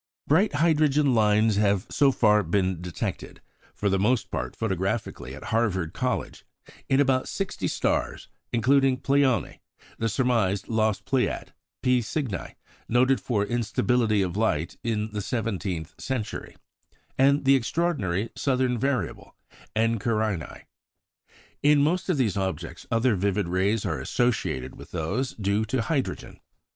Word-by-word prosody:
Bright 180 Hz, +7 st, +3 dB
hydrogen 150 Hz, -3 st, +3 dB
lines 110 Hz, -1 st, +3 dB
have 100 Hz, -2 st, +2 dB
so 140 Hz, -1 st, +4 dB
far 105 Hz, -4 st, +4 dB
been 95 Hz, -1 st, 0 dB
detected 90 Hz, -3 st, -5 dB, 0.4 s
for 105 Hz, -, -1 dB
the 95 Hz, -1 st, +2 dB
most 115 Hz, +3 st, +1 dB
part -, -, -3 dB
photographically 95 Hz, -, -3 dB
at -, -, -10 dB
Harvard 95 Hz, -8 st, 0 dB
College 125 Hz, -1 st, -3 dB, 0.5 s
in 135 Hz, -, +3 dB
about 130 Hz, -2 st, +2 dB
sixty 195 Hz, -1 st, -3 dB
stars, -, -, -1 dB, 0.2 s
including 130 Hz, +2 st, +3 dB
Pleione, 135 Hz, -1 st, +1 dB, 0.4 s
the 115 Hz, -, 0 dB
surmised 110 Hz, -5 st, +1 dB
lost 110 Hz, -2 st, 0 dB
Pleiad, 130 Hz, -2 st, -1 dB, 0.3 s
P 125 Hz, -1 st, +3 dB
Cygni, 115 Hz, -, -4 dB, 0.3 s
noted 130 Hz, +3 st, +3 dB
for 105 Hz, -5 st, 0 dB
instability 115 Hz, -2 st, +1 dB
of 90 Hz, -1 st, -3 dB
light 90 Hz, -6 st, 0 dB
in 110 Hz, -2 st, -1 dB
the 105 Hz, 0 st, -3 dB
seventeenth 95 Hz, -8 st, -3 dB
century, 130 Hz, -6 st, -4 dB, 0.6 s
and 140 Hz, +1 st, +3 dB
the 135 Hz, -, +6 dB
extraordinary 115 Hz, -, -1 dB
southern 130 Hz, -3 st, 0 dB
variable, 135 Hz, 0 st, -2 dB, 0.4 s
Eta 115 Hz, +1 st, +2 dB
Carinæ. 105 Hz, -, -2 dB, 1.0 s
In 145 Hz, 0 st, +5 dB
most 175 Hz, +5 st, 0 dB
of 180 Hz, -, +2 dB
these 115 Hz, -8 st, +1 dB
objects 95 Hz, -1 st, -4 dB
other 115 Hz, 0 st, +2 dB
vivid 100 Hz, 0 st, 0 dB
rays 95 Hz, +4 st, 0 dB
are -, -, -1 dB
associated 110 Hz, -, -1 dB
with -, -, -11 dB
those 110 Hz, +12 st, -2 dB
due 100 Hz, +1 st, 0 dB
to 115 Hz, +2 st, -1 dB
hydrogen. 140 Hz, +2 st, -3 dB
115 Hz, 130 wpm, -26 LUFS, 100-130 Hz, 1.0 s, the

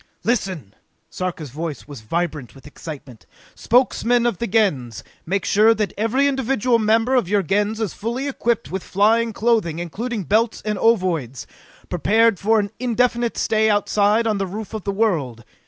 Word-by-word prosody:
"Listen!" 185 Hz, -, -2 dB, 0.4 s
Sarka's 170 Hz, -7 st, -5 dB
voice 155 Hz, +1 st, -6 dB
was 145 Hz, -6 st, -9 dB
vibrant 150 Hz, +2 st, -3 dB
with 135 Hz, -, -16 dB
excitement. 145 Hz, -5 st, -10 dB, 0.3 s
"Spokesmen 245 Hz, 0 st, +2 dB
of 235 Hz, -7 st, 0 dB
the 235 Hz, -, -2 dB
Gens, 145 Hz, -, 0 dB, 0.2 s
make 195 Hz, +3 st, -1 dB
sure 220 Hz, +3 st, +4 dB
that 210 Hz, -1 st, -2 dB
every 235 Hz, +6 st, +1 dB
individual 255 Hz, -3 st, +1 dB
member 225 Hz, +3 st, +2 dB
of 245 Hz, -9 st, +2 dB
your 205 Hz, -1 st, +2 dB
Gens 205 Hz, +5 st, 0 dB
is 220 Hz, -4 st, -2 dB
fully 235 Hz, +6 st, -4 dB
equipped 235 Hz, -4 st, -1 dB
with 190 Hz, 0 st, -3 dB
flying 225 Hz, +5 st, +2 dB
clothing 215 Hz, -7 st, 0 dB
including 205 Hz, +6 st, -4 dB
belts 220 Hz, +5 st, +1 dB
and 210 Hz, -2 st, -2 dB
ovoids 175 Hz, -, 0 dB, 0.4 s
prepared 220 Hz, +4 st, +2 dB
for 220 Hz, +2 st, +3 dB
an 200 Hz, -1 st, -2 dB
indefinite 240 Hz, -1 st, 0 dB
stay 220 Hz, -1 st, +2 dB
outside 210 Hz, +1 st, +2 dB
on 215 Hz, -3 st, 0 dB
the 195 Hz, -, -1 dB
roof 210 Hz, +4 st, -7 dB
of 215 Hz, -3 st, -6 dB
the 200 Hz, -, 0 dB
world! 160 Hz, -, -1 dB
210 Hz, 160 wpm, -21 LUFS, 175-230 Hz, 0.4 s, sure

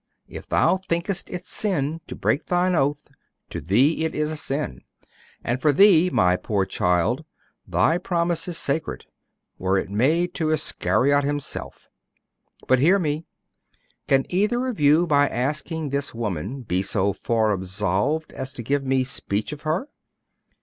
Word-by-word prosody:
If -, -, -9 dB
thou -, -, +3 dB
thinkest 180 Hz, 0 st, -3 dB
it 180 Hz, -, -6 dB
sin 165 Hz, -6 st, -1 dB
to -, -, -7 dB
break 150 Hz, -, 0 dB
thine 180 Hz, +1 st, +2 dB
oath, 145 Hz, -2 st, 0 dB, 0.5 s
to -, -, -4 dB
thee 125 Hz, -, +2 dB
it 160 Hz, -, -2 dB
is 150 Hz, 0 st, -1 dB
sin. 135 Hz, -, -3 dB, 0.6 s
And 125 Hz, +2 st, -1 dB
for 150 Hz, -, +4 dB
thee, 180 Hz, +2 st, +6 dB
my 90 Hz, -, +3 dB
poor 100 Hz, 0 st, -1 dB
child, 90 Hz, -, 0 dB, 0.4 s
thy 165 Hz, +2 st, +2 dB
promise 170 Hz, -2 st, -1 dB
is 175 Hz, -2 st, -4 dB
sacred, 155 Hz, +2 st, -2 dB, 0.5 s
were 95 Hz, +1 st, +1 dB
it 95 Hz, -, -3 dB
made 160 Hz, -, +1 dB
to 160 Hz, -2 st, -1 dB
Iscariot 140 Hz, -, +2 dB
himself. 145 Hz, 0 st, -4 dB, 0.8 s
But 130 Hz, -, +4 dB
hear 175 Hz, +9 st, +5 dB
me. 155 Hz, -3 st, -2 dB, 0.8 s
Can 135 Hz, 0 st, +3 dB
either 210 Hz, +7 st, +1 dB
of 250 Hz, -8 st, -4 dB
you, 150 Hz, +4 st, +5 dB
by 145 Hz, -3 st, +3 dB
asking 150 Hz, +4 st, -2 dB
this 140 Hz, -2 st, -3 dB
woman, 110 Hz, -, -4 dB
be 95 Hz, -4 st, 0 dB
so 100 Hz, 0 st, 0 dB
far 110 Hz, 0 st, 0 dB
absolved 100 Hz, -, -1 dB
as 130 Hz, 0 st, -5 dB
to 120 Hz, -, -5 dB
give 140 Hz, +4 st, 0 dB
me 135 Hz, -1 st, +1 dB
speech 110 Hz, -4 st, -3 dB
of 150 Hz, -, -9 dB
her? 160 Hz, -, -1 dB
145 Hz, 150 wpm, -23 LUFS, 115-165 Hz, 0.8 s, thee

